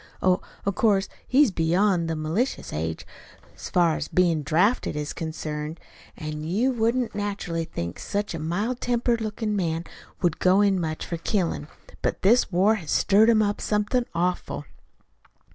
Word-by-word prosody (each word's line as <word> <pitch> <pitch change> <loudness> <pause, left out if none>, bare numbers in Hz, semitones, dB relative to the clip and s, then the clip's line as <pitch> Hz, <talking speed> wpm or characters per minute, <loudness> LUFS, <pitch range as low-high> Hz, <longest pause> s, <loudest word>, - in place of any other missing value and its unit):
Oh, 185 -1 +2 0.2
of 200 - +1
course, 200 -2 +2 0.2
he's 270 -2 +4
beyond 175 +1 +2
the 165 - -1
malicious 160 +12 -2
age, 80 +1 -3 0.5
so - - -8
far 170 -3 +3
as - - -4
bein' 170 -4 +2
drafted 175 - +1
is 150 0 -3
concerned, 155 -1 -5 0.4
an' 155 -1 -5
you 210 +11 +1
wouldn't 235 +1 0
naturally 200 -5 -3
think 85 - -5
such 205 -1 -2
a 165 - -4
mild 205 +11 -2
tempered 240 -1 +1
lookin' 215 0 -2
man 165 -4 -1 0.4
would 170 -2 +1
go 185 +2 +4
in 200 -2 +3
much 155 -1 -3
for 170 - -4
killin'. 170 -5 -1 0.3
But - - -2
this 225 +2 +4
war's 190 -2 +2
stirred 210 +3 +4
him 220 -2 +5
up 205 0 -1
somethin' 215 +4 0
awful." 170 - -1
185 Hz, 155 wpm, -25 LUFS, 160-215 Hz, 0.5 s, him